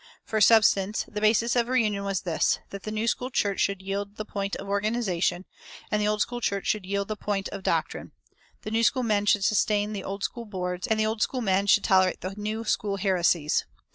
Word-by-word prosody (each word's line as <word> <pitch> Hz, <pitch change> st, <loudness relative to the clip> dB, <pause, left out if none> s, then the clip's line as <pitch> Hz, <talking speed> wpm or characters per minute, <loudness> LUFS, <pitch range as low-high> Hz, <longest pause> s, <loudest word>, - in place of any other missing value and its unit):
For 215 Hz, -1 st, -1 dB
substance, 210 Hz, -2 st, +4 dB
the 210 Hz, -, -5 dB
basis 225 Hz, +2 st, +3 dB
of 240 Hz, -1 st, +2 dB
reunion 215 Hz, -6 st, +1 dB
was 195 Hz, -2 st, -1 dB
this: 165 Hz, -4 st, +1 dB
that 200 Hz, -, -7 dB
the 215 Hz, -, -6 dB
New 215 Hz, +2 st, -2 dB
School 250 Hz, +2 st, -1 dB
church 200 Hz, -6 st, 0 dB
should 195 Hz, -1 st, 0 dB
yield 200 Hz, +1 st, -4 dB
the 215 Hz, -, -5 dB
point 200 Hz, -1 st, -3 dB
of 195 Hz, -, -7 dB
organization, 200 Hz, -4 st, 0 dB, 0.5 s
and 210 Hz, 0 st, +1 dB
the 210 Hz, -, +1 dB
Old 210 Hz, 0 st, +2 dB
School 240 Hz, 0 st, -6 dB
church 200 Hz, -3 st, -1 dB
should 205 Hz, -4 st, -1 dB
yield 200 Hz, 0 st, -1 dB
the 215 Hz, -, -3 dB
point 200 Hz, -2 st, -3 dB
of 200 Hz, -, -7 dB
doctrine; -, -, -2 dB, 0.5 s
the 215 Hz, -, -5 dB
New 225 Hz, +1 st, +2 dB
School 250 Hz, +2 st, +2 dB
men 205 Hz, -3 st, +1 dB
should 205 Hz, -1 st, +3 dB
sustain 210 Hz, 0 st, +1 dB
the 200 Hz, -2 st, -5 dB
Old 195 Hz, +1 st, -5 dB
School 235 Hz, -1 st, -4 dB
boards, 180 Hz, -2 st, -4 dB
and 220 Hz, -2 st, +1 dB
the 215 Hz, -, +2 dB
Old 220 Hz, 0 st, -2 dB
School 255 Hz, +2 st, 0 dB
men 195 Hz, -2 st, +1 dB
should 205 Hz, 0 st, +5 dB
tolerate 185 Hz, -1 st, +3 dB
the 185 Hz, +1 st, -4 dB
New 215 Hz, +2 st, -3 dB
School 205 Hz, -2 st, -1 dB
heresies. 175 Hz, -5 st, +1 dB
205 Hz, 220 wpm, -26 LUFS, 195-215 Hz, 0.5 s, should